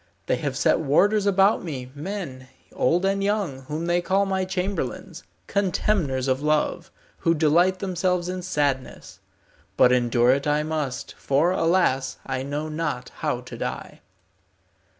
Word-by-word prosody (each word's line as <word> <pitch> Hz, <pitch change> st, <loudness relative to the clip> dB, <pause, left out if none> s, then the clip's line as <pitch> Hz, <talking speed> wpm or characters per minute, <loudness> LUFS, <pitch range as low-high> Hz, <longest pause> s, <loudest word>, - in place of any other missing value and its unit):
They -, -, +1 dB
have -, -, -3 dB
set -, -, +3 dB
warders 195 Hz, +8 st, +3 dB
about 195 Hz, +1 st, +3 dB
me, 130 Hz, -7 st, -6 dB
men, 145 Hz, -5 st, -6 dB, 0.3 s
old 175 Hz, +8 st, +2 dB
and 195 Hz, 0 st, +1 dB
young, 200 Hz, -9 st, -1 dB
whom 155 Hz, +4 st, -4 dB
they 175 Hz, +1 st, +1 dB
call 195 Hz, +3 st, +1 dB
my 190 Hz, -1 st, -1 dB
chamberlains, 190 Hz, +1 st, -3 dB, 0.2 s
contemners 180 Hz, -9 st, 0 dB
of 130 Hz, +1 st, +1 dB
love, 150 Hz, 0 st, 0 dB, 0.3 s
who 165 Hz, -1 st, +2 dB
delight 170 Hz, +4 st, +3 dB
themselves 180 Hz, -2 st, -1 dB
in 185 Hz, 0 st, -3 dB
sadness. 145 Hz, -7 st, -2 dB, 0.6 s
But 125 Hz, -, +6 dB
endure 120 Hz, 0 st, +3 dB
it 140 Hz, +2 st, 0 dB
I 150 Hz, +1 st, +2 dB
must, 150 Hz, -5 st, -3 dB
for, 145 Hz, +6 st, +2 dB
alas, 165 Hz, -7 st, +1 dB
I 130 Hz, -1 st, -2 dB
know 145 Hz, +3 st, -3 dB
not 150 Hz, -5 st, -3 dB
how -, -, -2 dB
to -, -, -10 dB
die." -, -, -6 dB
165 Hz, 145 wpm, -24 LUFS, 135-185 Hz, 0.6 s, But